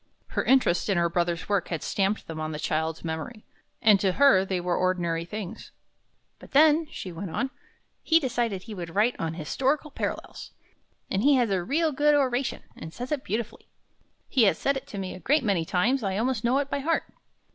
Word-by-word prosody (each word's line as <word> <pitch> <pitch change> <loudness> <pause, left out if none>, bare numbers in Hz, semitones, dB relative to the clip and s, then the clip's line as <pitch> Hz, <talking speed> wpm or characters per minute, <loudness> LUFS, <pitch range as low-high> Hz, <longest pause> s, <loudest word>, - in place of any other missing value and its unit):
Her - - -1
interest 250 -9 +3
in 195 - +2
her 170 0 +2
brother's 170 -1 -1
work 200 -3 0
had 165 -3 -4
stamped 200 +1 0
them 160 -1 -7
on 155 0 -3
the - - -4
child's 160 +2 -2
memory, 165 +8 -5 0.4
and 210 -3 +6
to 190 -1 +1
her 275 -6 +5
they 190 -1 -2
were 175 0 -1
ordinary 170 -2 0
things. 200 0 -7 0.7
"But - - -15
then," 310 +2 +5
she 190 - -7
went 175 +3 -6
on, 265 +11 -2 0.5
"he 325 0 +4
decided 240 - -1
that - - -17
he 225 - -7
would 175 -3 -7
write 220 +4 +3
on 165 -1 -2
'Historical 270 - -1
Parallels,' - - -5 0.6
and 195 - +1
he 285 +4 +5
has 240 -5 +2
a 185 -2 0
real 315 - +1
good 295 +2 +3
oration, 260 -2 0
and 160 - -9
says 245 - -7
it 295 -3 -1
beautifully. 220 +3 -4 0.6
He 245 -4 +3
has 195 - +3
said 275 - 0
it 270 +1 -6
to 215 - -8
me 190 -1 -4
a - - -9
great 290 +7 +2
many 195 -7 +1
times. 210 +9 +1
I 195 -2 -1
almost 235 0 0
know 245 +3 +2
it 280 0 -1
by 280 - 0
heart. 325 +4 0
210 Hz, 210 wpm, -26 LUFS, 175-265 Hz, 0.7 s, and